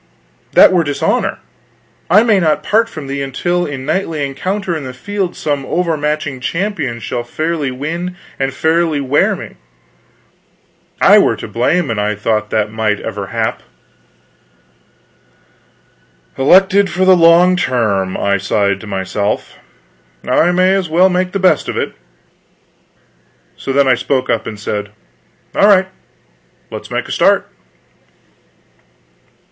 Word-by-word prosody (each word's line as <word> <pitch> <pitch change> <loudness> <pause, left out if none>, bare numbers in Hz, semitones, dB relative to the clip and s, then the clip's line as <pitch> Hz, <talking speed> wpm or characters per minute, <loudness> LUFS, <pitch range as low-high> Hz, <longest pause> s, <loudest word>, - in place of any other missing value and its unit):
That - - +7
were 175 -2 +3
dishonor. 145 -2 -1 0.7
I 205 +6 +6
may 215 -4 +3
not 155 -4 +1
part 225 +2 +2
from 155 -9 -8
thee 140 +1 -4
until 175 +6 -1
in 130 -2 -6
knightly 155 -2 -1
encounter 185 +6 -3
in 155 - -5
the 130 -1 -7
field 190 +6 -3
some 145 -7 -2
overmatching 150 -4 -2
champion 165 - -3
shall 115 +2 -4
fairly 155 +3 -2
win 165 +7 -4 0.2
and 135 0 0
fairly 160 0 +1
wear 140 +1 +1
me. - - -10 1.4
I - - +7
were - - +2
to - - -8
blame 135 +5 0
an 110 - -2
I 105 +1 -1
thought 105 0 -1
that 110 -1 0
that - - -16
might 110 -2 0
ever 105 -3 -5
hap." 115 0 -2 2.7
"Elected 190 +8 +4
for 185 +2 0
the 185 0 +6
long 175 +2 +5
term," 110 - 0
I 100 0 +1
sighed 100 0 0
to 110 - -10
myself. 100 +1 -3 0.7
"I 175 - +3
may 185 +1 +3
as 190 -4 -1
well 180 +4 +4
make 180 0 -1
the 200 - -2
best 190 -1 +2
of - - -3
it." - - -2 1.6
So 135 - -5
then 140 0 +3
I 130 - +5
spoke 130 +1 -1
up 115 - -1
and 105 -2 -7
said: 105 0 -4 0.6
"All 200 - +4
right; 190 -2 +4 0.8
let - - -6
us - - -14
make - - -3
a - - -7
start." - - +2
145 Hz, 140 wpm, -15 LUFS, 115-180 Hz, 2.7 s, That